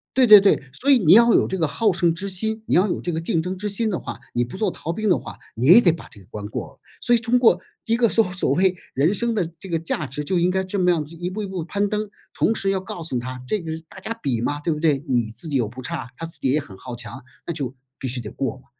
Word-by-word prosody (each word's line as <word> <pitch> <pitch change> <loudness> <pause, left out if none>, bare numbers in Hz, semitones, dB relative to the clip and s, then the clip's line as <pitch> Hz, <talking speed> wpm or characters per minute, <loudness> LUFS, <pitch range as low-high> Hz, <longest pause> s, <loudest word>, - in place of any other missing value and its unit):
对 260 -2 +5
对 210 -1 +11
对， 190 -9 +2
所 275 - +1
以 265 - +6
你 170 -3 +6
要 235 +2 +7
有 - - +3
这 190 - -3
个 165 -3 +1
好 215 +7 +1
胜 170 -2 +2
之 195 +4 -4
心， 220 +4 0
你 - - +2
要 185 +4 +4
有 - - -2
这 175 - -2
个 160 - -2
竞 165 0 0
争 185 +3 -4
之 210 +3 -3
心 215 +2 +1
的 185 - -2
话， - - -7 0.2
你 120 0 +1
不 125 - -10
做 205 +1 0
逃 165 -1 -5
兵 215 +2 -1
的 180 - +4
话， - - -10 0.2
你 115 +3 -2
也 175 - +9
得 175 - +5
把 165 - -8
这 105 - -13
个 95 - -18
关 105 -1 -7
过 - - -5
了。 - - -30 0.2
所 240 -1 +3
以 - - +2
通 245 +1 +1
过 225 -7 +4 0.3
一 230 +1 +2
个 240 - +4
说 225 +1 +3
所 180 -6 0
谓 185 +5 +2 0.2
人 155 +9 +2
生 235 +2 0
的 175 -6 -1
这 190 - -8
个 165 -1 0
价 165 -1 -2
值， 145 +2 -5
就 180 +4 -1
应 175 +1 +2
该 190 0 0
这 190 +2 -4
么 180 -1 +3
样 165 -3 0
子 155 +3 -10
一 175 +2 -4
步 215 +3 -4
一 205 - -4
步 185 -4 -5
攀 200 +3 -1
登， 210 0 -3 0.2
同 225 - +1
时 195 -3 -1
要 195 -1 +1
告 185 -2 -8
诉 155 -6 -1
她 125 +1 -5
这 215 - 0
个 160 -2 -6
是 160 - -5
大 190 - -12
家 220 - -4
比 125 -5 -1
嘛， 145 +5 -2
对 165 - -1
不 150 - -2
对？ 150 -4 +1
你 120 -3 +1
自 120 +8 -3
己 145 - -3
又 120 -4 0
不 125 +4 -9
差， 125 0 -5
她 165 +4 -5
自 165 - -1
己 130 - +1
也 150 - +3
很 100 -10 -11
好 125 +2 -8
强， 125 +1 -8 0.2
那 - - -1
就 140 -6 -4 0.2
必 130 - -4
须 125 0 -2
得 105 - -7
过 135 +2 -3
嘛， 130 - -21
170 Hz, 340 characters per minute, -22 LUFS, 140-200 Hz, 0.3 s, 对